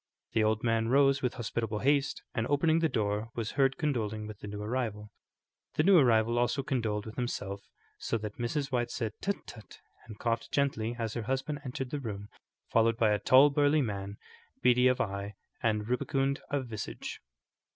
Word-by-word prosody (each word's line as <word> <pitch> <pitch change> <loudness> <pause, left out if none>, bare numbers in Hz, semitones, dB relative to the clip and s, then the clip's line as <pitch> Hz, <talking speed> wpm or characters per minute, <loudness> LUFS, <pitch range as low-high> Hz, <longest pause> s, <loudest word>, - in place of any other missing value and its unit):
The 110 - +2
old 110 0 +1
man 115 -1 +1
rose 135 +2 +4
with 125 - -1
hospitable 115 -2 -2
haste, 140 +4 +1
and 115 +1 -1
opening 160 +3 +3
the 165 -1 +2
door, 105 -1 -1
was 115 -2 -3
heard 135 -1 +2
condoling 110 -9 -1
with 105 -1 -8
the - - -8
new 105 0 -6
arrival. 105 -3 -3 0.6
The 150 - +3
new 190 0 +7
arrival 120 -2 +3
also 120 +3 +1
condoled 115 -7 -1
with 110 - -9
himself, 100 -5 -3 0.4
so 115 - -1
that 105 0 -7
Mrs. 135 +4 -2
White 120 -2 0
said, 115 -3 -3
"Tut, 200 +1 -2
tut!" 110 -3 -12 0.3
and 110 -2 -9
coughed 115 +1 -2
gently 120 -5 0
as 115 -2 -3
her 120 - -3
husband 135 +5 -2
entered 135 0 -5
the 145 - -2
room, 105 -5 -6 0.4
followed 115 0 +3
by 110 -2 +3
a 105 - +2
tall, 135 +6 +6
burly 145 +1 +3
man, 100 -2 -4 0.5
beady 125 0 +5
of 125 0 +2
eye 100 0 -3 0.3
and 105 -2 0
rubicund 135 +3 0
of 140 -2 -1
visage. 110 -3 -6
120 Hz, 185 wpm, -30 LUFS, 110-135 Hz, 0.6 s, new